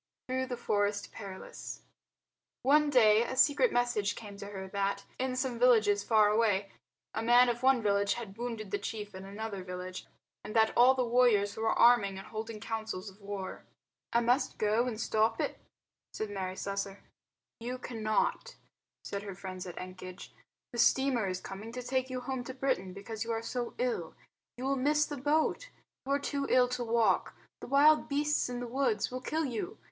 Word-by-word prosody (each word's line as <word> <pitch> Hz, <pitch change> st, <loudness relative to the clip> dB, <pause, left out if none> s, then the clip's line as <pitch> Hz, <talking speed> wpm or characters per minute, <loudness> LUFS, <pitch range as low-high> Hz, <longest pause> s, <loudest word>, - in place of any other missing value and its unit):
Through 260 Hz, 0 st, -1 dB
the 250 Hz, -1 st, -4 dB
Forest 205 Hz, -3 st, 0 dB
Perilous 195 Hz, -3 st, -8 dB, 0.8 s
One 295 Hz, +3 st, +5 dB
day 220 Hz, -5 st, +6 dB
a 250 Hz, +2 st, -3 dB
secret 290 Hz, -, +4 dB
message 240 Hz, -4 st, +1 dB
came 205 Hz, -3 st, -9 dB
to 200 Hz, 0 st, -7 dB
her 190 Hz, -2 st, -6 dB
that, 200 Hz, 0 st, -1 dB
in 255 Hz, 0 st, -1 dB
some 255 Hz, -2 st, -2 dB
villages 220 Hz, -5 st, +5 dB
far 215 Hz, -2 st, +4 dB
away, 210 Hz, -3 st, +2 dB, 0.4 s
a 220 Hz, -, -2 dB
man 240 Hz, +2 st, +6 dB
of 240 Hz, 0 st, -2 dB
one 260 Hz, -3 st, +4 dB
village 200 Hz, -1 st, +2 dB
had 220 Hz, -5 st, -7 dB
wounded 225 Hz, -3 st, -5 dB
the 205 Hz, -, 0 dB
chief 210 Hz, 0 st, -5 dB
in 190 Hz, 0 st, -8 dB
another 200 Hz, -1 st, -5 dB
village 180 Hz, 0 st, -7 dB, 0.4 s
and 215 Hz, -, -7 dB
that 220 Hz, -1 st, +4 dB
all 255 Hz, +2 st, +7 dB
the 255 Hz, -1 st, +1 dB
warriors 230 Hz, -4 st, +3 dB
were 225 Hz, 0 st, 0 dB
arming 220 Hz, -5 st, +5 dB
and 195 Hz, -, -8 dB
holding 220 Hz, 0 st, -6 dB
councils 220 Hz, -3 st, -4 dB
of 195 Hz, +2 st, -22 dB
war. 200 Hz, -1 st, -6 dB, 0.5 s
"I 235 Hz, -, +3 dB
must 245 Hz, +4 st, +1 dB
go 215 Hz, +3 st, +2 dB
and 220 Hz, -3 st, -4 dB
stop 220 Hz, 0 st, +1 dB
it," -, -, -2 dB, 0.5 s
said 215 Hz, -1 st, -4 dB
Mary 185 Hz, -2 st, -3 dB
Slessor. 200 Hz, 0 st, -4 dB, 0.6 s
"You 245 Hz, +2 st, -4 dB
cannot," 235 Hz, -, -1 dB, 0.5 s
said 200 Hz, -, -4 dB
her 200 Hz, -2 st, -7 dB
friends 185 Hz, -1 st, -7 dB
at 175 Hz, -, -8 dB
Ekenge, 185 Hz, 0 st, -8 dB, 0.4 s
"the 240 Hz, -, -5 dB
steamer 250 Hz, -3 st, +3 dB
is 185 Hz, -1 st, -2 dB
coming 200 Hz, +5 st, -8 dB
to 250 Hz, 0 st, -5 dB
take 260 Hz, +1 st, -1 dB
you 255 Hz, -1 st, -4 dB
home 260 Hz, 0 st, -3 dB
to 260 Hz, -, -7 dB
Britain 255 Hz, -9 st, -1 dB
because 210 Hz, +3 st, -6 dB
you 230 Hz, -, -4 dB
are 225 Hz, 0 st, -2 dB
so 240 Hz, +1 st, -4 dB
ill. 235 Hz, -10 st, -2 dB, 0.4 s
You 250 Hz, -, -6 dB
will 275 Hz, +1 st, +1 dB
miss 300 Hz, +3 st, +3 dB
the 290 Hz, -, -6 dB
boat. 310 Hz, -, +1 dB, 0.4 s
You 275 Hz, -, +1 dB
are 280 Hz, -, +2 dB
too 280 Hz, 0 st, -2 dB
ill 250 Hz, -1 st, +5 dB
to 250 Hz, 0 st, -2 dB
walk. 230 Hz, -1 st, +2 dB, 0.2 s
The -, -, -8 dB
wild 290 Hz, +4 st, +5 dB
beasts 295 Hz, -1 st, +1 dB
in 245 Hz, 0 st, -4 dB
the -, -, -3 dB
woods 240 Hz, -4 st, 0 dB
will 255 Hz, 0 st, -4 dB
kill 315 Hz, +4 st, -1 dB
you. 280 Hz, -, -4 dB
225 Hz, 185 wpm, -31 LUFS, 200-255 Hz, 0.8 s, all